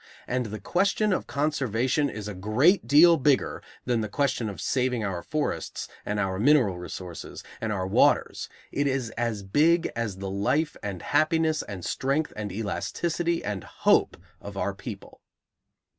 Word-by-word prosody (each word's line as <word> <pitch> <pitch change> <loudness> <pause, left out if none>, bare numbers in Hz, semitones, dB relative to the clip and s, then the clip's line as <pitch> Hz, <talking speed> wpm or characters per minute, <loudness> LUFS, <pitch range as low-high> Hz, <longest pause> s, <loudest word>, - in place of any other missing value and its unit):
And 125 -2 -1
the 105 0 -6
question 200 +3 +1
of - - -2
conservation 140 -1 0
is 105 -1 -6
a 105 - -4
great 115 - +3
deal 165 +5 +7
bigger 140 -1 +1 0.2
than 120 -2 +1
the 110 - -3
question 130 -3 0
of 100 - -8
saving 125 -3 0
our 95 -3 -3
forests 155 - -3 0.2
and 105 0 -1
our 95 -2 -1
mineral 120 -8 +4
resources 90 -1 -7 0.2
and 110 - -1
our 95 -3 -1
waters; 95 - +2 0.2
it 140 0 0
is 130 -4 -1
as 115 -4 -2
big 165 - +3
as 115 -5 -3
the 95 0 -5
life 100 +11 0
and 95 -4 -5
happiness 155 +1 +2
and 95 -4 -7
strength 140 +4 -1
and 105 -1 -4
elasticity 165 - -2
and 100 -2 -3
hope - - +2 0.2
of - - -8
our - - -1
people. - - -9
120 Hz, 160 wpm, -26 LUFS, 100-150 Hz, 0.2 s, deal